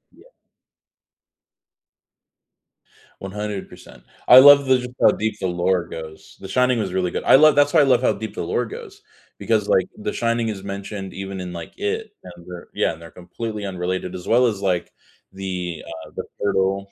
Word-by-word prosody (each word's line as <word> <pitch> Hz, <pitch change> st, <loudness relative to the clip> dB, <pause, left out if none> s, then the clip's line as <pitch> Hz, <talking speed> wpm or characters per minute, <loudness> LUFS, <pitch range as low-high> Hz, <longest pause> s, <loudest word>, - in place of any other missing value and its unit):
Yeah. -, -, -20 dB, 3.0 s
100%. 95 Hz, -10 st, -7 dB, 0.2 s
I 125 Hz, -, +10 dB
love 140 Hz, +1 st, +8 dB
the 130 Hz, -1 st, +3 dB
just 125 Hz, 0 st, -6 dB
how -, -, +6 dB
deep 110 Hz, -1 st, -3 dB
the 95 Hz, -, -1 dB
lore 90 Hz, 0 st, 0 dB
goes. 80 Hz, -1 st, -10 dB
The 95 Hz, -, -9 dB
Shining 125 Hz, +2 st, +2 dB
was 100 Hz, -4 st, -2 dB
really 90 Hz, -1 st, -1 dB
good. -, -, -4 dB
I -, -, +6 dB
love 155 Hz, +1 st, +6 dB
that's 145 Hz, 0 st, +4 dB
why -, -, +5 dB
I -, -, +5 dB
love 125 Hz, -3 st, +3 dB
how 130 Hz, -, +2 dB
deep 110 Hz, -, -7 dB
the -, -, -4 dB
lore -, -, -1 dB
goes, 420 Hz, -3 st, -11 dB, 0.3 s
because, -, -, 0 dB
like, -, -, +3 dB
The 210 Hz, -, -4 dB
Shining 115 Hz, -1 st, 0 dB
is 100 Hz, -2 st, -6 dB
mentioned 100 Hz, -1 st, -6 dB
even 95 Hz, 0 st, -6 dB
in, 90 Hz, -1 st, -6 dB
like, 85 Hz, -, -8 dB
It, 435 Hz, +2 st, -3 dB
and 85 Hz, -2 st, -13 dB
they're 90 Hz, -1 st, -10 dB
yeah -, -, 0 dB
and 80 Hz, -, -14 dB
they're 85 Hz, -1 st, -12 dB
completely 105 Hz, +5 st, -7 dB
unrelated, 90 Hz, -1 st, -4 dB
as 90 Hz, -, -8 dB
well 125 Hz, +2 st, +4 dB
as, 105 Hz, -4 st, -3 dB
like, 90 Hz, -3 st, -1 dB, 0.4 s
the, 90 Hz, -4 st, -5 dB, 0.2 s
uh, -, -, -17 dB
the -, -, -4 dB, 0.2 s
Turtle 100 Hz, 0 st, 0 dB
100 Hz, 185 wpm, -21 LUFS, 90-125 Hz, 3.0 s, I